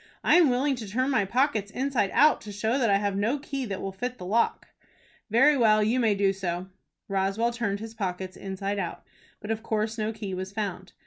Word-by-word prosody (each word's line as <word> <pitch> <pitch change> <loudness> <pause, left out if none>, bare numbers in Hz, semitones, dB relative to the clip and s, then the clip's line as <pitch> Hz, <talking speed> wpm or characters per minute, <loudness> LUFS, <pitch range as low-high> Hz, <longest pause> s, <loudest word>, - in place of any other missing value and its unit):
"I - - +5
am 340 -5 +6
willing 265 +3 +1
to 225 -3 -6
turn 255 +6 0
my 210 -7 +2
pockets 225 -1 +1
inside 255 -4 0
out, 300 +1 +5
to 210 - -8
show 220 +6 0
that 235 -4 +2
I 200 - +5
have 200 -1 -1
no 220 +8 +1
key 275 -2 -4
that 195 -4 -5
will 195 - -3
fit 245 +6 -5
the 180 - -8
lock." 225 +5 +1 0.6
"Very 270 +7 +5
well. 215 -4 +4
You 230 +4 +1
may 220 -4 +3
do 195 -1 +2
so." 185 -1 -4 0.4
Roswell 195 +4 0
turned 220 -4 -2
his 225 +1 -8
pockets 185 -3 -4
inside 195 +1 -4
out, - - -4 0.4
but 210 - -4
of 220 0 -2
course 220 0 -2
no 215 +1 0
key 210 -3 -6
was 185 +1 -4
found. 195 -3 -4
215 Hz, 215 wpm, -27 LUFS, 195-240 Hz, 0.6 s, am